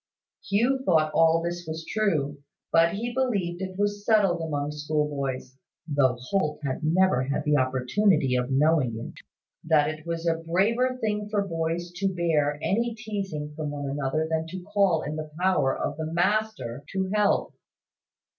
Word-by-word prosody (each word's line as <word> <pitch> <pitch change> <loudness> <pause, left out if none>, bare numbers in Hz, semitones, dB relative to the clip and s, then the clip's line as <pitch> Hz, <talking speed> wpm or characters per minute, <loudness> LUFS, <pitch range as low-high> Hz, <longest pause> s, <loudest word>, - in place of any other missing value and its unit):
Hugh 240 +7 +2
thought 155 -7 +3
all 165 0 +4
this 175 0 -4
was 160 0 -5
true: 150 -9 -1 0.3
but 165 +2 +4
he 235 +4 -3
believed 200 -9 -1
it 185 -1 -5
was 205 0 -1
settled 200 -6 +3
among 145 -2 -2
schoolboys 145 -3 -3 0.3
(though 135 -4 +2
Holt 150 +2 -1
had 130 -2 -2
never 170 -3 +3
had 140 +2 -1
the 150 -1 +3
opportunity 130 +3 +2
of 125 0 0
knowing 135 -4 +2
it) 115 - -9 0.4
that 155 -2 +3
it 155 0 -10
was 170 0 -4
a 165 -1 +2
braver 220 +10 +1
thing 210 -2 -2
for 205 -2 0
boys 165 0 -2
to 195 +1 +1
bear 150 -4 +1
any 230 +3 0
teasing 195 -9 -4
from 155 -1 -3
one 145 -1 -5
another 145 +3 -1
than 160 0 -1
to 180 +2 -7
call 195 -4 +2
in 150 +2 -4
the 155 0 -5
power 185 -7 +2
of 145 - -3
the 160 0 -4
master 185 - 0
to 190 -1 -1
help. 210 -1 +2
165 Hz, 165 wpm, -26 LUFS, 150-195 Hz, 0.4 s, all